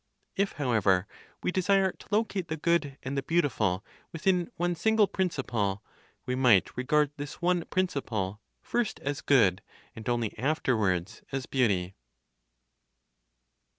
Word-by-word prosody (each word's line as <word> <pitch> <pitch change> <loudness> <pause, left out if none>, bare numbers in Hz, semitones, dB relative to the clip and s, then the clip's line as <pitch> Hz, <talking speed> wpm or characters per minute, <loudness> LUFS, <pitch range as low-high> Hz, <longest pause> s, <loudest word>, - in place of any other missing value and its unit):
If, 200 0 0
however, 105 -9 +2 0.4
we - - +1
desire 190 +1 +3
to - - -17
locate 205 -4 0
the 160 - -3
Good 155 -4 +1
and 130 +2 -3
the 140 - 0
Beautiful 115 - 0 0.3
within 175 +1 +1
one 175 +1 +1
single 220 +5 +3
principle, 120 - -1 0.4
we 125 - -1
might 125 -7 +4
regard 150 +3 +2
this 145 0 -7
one 175 -1 +1
principle 110 - -2 0.2
first 240 -3 -1
as 145 +1 -3
Good, 100 -10 +4 0.3
and 110 +1 -5
only 120 -3 -1
afterwards, 110 - 0
as 135 -1 -3
Beauty. 100 -8 +1
140 Hz, 125 wpm, -29 LUFS, 110-175 Hz, 0.4 s, might